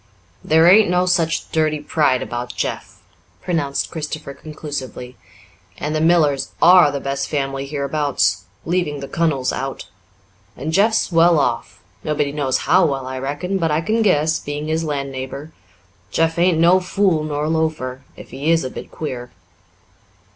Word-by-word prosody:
"There 160 Hz, +1 st, +4 dB
ain't 200 Hz, +2 st, +6 dB
no 180 Hz, 0 st, +2 dB
such 165 Hz, -2 st, 0 dB
dirty 155 Hz, -1 st, +1 dB
pride 145 Hz, -3 st, +1 dB
about 120 Hz, 0 st, -5 dB
Jeff," -, -, -5 dB, 0.4 s
pronounced 145 Hz, -6 st, -1 dB
Christopher 155 Hz, -2 st, -5 dB
conclusively. 140 Hz, -5 st, -7 dB, 0.6 s
"And 150 Hz, +1 st, -3 dB
the 155 Hz, -, 0 dB
Millers 155 Hz, -5 st, +2 dB
are 175 Hz, -3 st, +7 dB
the 140 Hz, -, -3 dB
best 140 Hz, 0 st, -3 dB
family 135 Hz, -1 st, -2 dB
hereabouts, 145 Hz, 0 st, 0 dB, 0.2 s
leaving 165 Hz, -4 st, -1 dB
the 140 Hz, -, -6 dB
kunnel's 150 Hz, -6 st, 0 dB
out. 135 Hz, 0 st, -5 dB, 0.7 s
And 155 Hz, +3 st, -4 dB
Jeff's 215 Hz, +3 st, +2 dB
well 165 Hz, 0 st, +5 dB
off 120 Hz, -8 st, -2 dB, 0.2 s
nobody 150 Hz, -2 st, -1 dB
knows 140 Hz, -3 st, 0 dB
how 185 Hz, +3 st, +5 dB
well, 135 Hz, -3 st, -3 dB
I 130 Hz, 0 st, -5 dB
reckon, 145 Hz, +9 st, -3 dB
but 165 Hz, -2 st, +1 dB
I 150 Hz, +1 st, +1 dB
can 220 Hz, +6 st, 0 dB
guess, 160 Hz, -6 st, +2 dB
being 145 Hz, +1 st, -5 dB
his 160 Hz, +1 st, 0 dB
land 140 Hz, -3 st, -3 dB
neighbour. 135 Hz, +3 st, -7 dB, 0.6 s
Jeff 165 Hz, +7 st, 0 dB
ain't 175 Hz, -1 st, +3 dB
no 170 Hz, +3 st, +5 dB
fool 185 Hz, -3 st, +1 dB
nor 150 Hz, 0 st, -2 dB
loafer, 155 Hz, -5 st, -1 dB, 0.2 s
if -, -, -12 dB
he 145 Hz, +4 st, -3 dB
is 165 Hz, 0 st, +3 dB
a 130 Hz, -, -4 dB
bit -, -, -8 dB
queer." 125 Hz, -6 st, -6 dB
155 Hz, 155 wpm, -20 LUFS, 140-165 Hz, 0.7 s, are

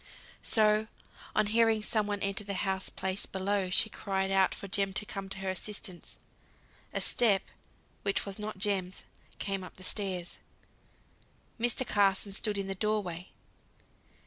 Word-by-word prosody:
So, 215 Hz, 0 st, +4 dB, 0.5 s
on -, -, +4 dB
hearing 225 Hz, 0 st, +3 dB
some 215 Hz, -1 st, +1 dB
one 205 Hz, -1 st, -2 dB
enter 200 Hz, +1 st, 0 dB
the 200 Hz, -1 st, -4 dB
house 190 Hz, 0 st, -1 dB
place 190 Hz, +1 st, -2 dB
below, 190 Hz, 0 st, 0 dB
she 185 Hz, -, +5 dB
cried 195 Hz, -2 st, -1 dB
out 195 Hz, -1 st, +4 dB
for 200 Hz, -, -7 dB
Jem 195 Hz, 0 st, 0 dB
to 210 Hz, -, +2 dB
come 195 Hz, -1 st, -5 dB
to 195 Hz, -, -3 dB
her 190 Hz, -, -1 dB
assistance. 190 Hz, -1 st, -1 dB, 0.7 s
A -, -, -1 dB
step, 215 Hz, -5 st, +3 dB, 0.6 s
which 200 Hz, -1 st, +1 dB
was 200 Hz, +1 st, -5 dB
not 210 Hz, -1 st, -4 dB
Jem's, 190 Hz, -2 st, -1 dB, 0.3 s
came 195 Hz, -1 st, -2 dB
up 180 Hz, -, -10 dB
the 185 Hz, -, -12 dB
stairs. 185 Hz, -3 st, -3 dB, 1.2 s
Mr. 240 Hz, +2 st, +2 dB
Carson 200 Hz, -1 st, +2 dB
stood 210 Hz, 0 st, +2 dB
in 195 Hz, -, -1 dB
the 195 Hz, -, -2 dB
door 210 Hz, +2 st, 0 dB
way. 175 Hz, 0 st, -6 dB
200 Hz, 155 wpm, -31 LUFS, 190-210 Hz, 1.2 s, she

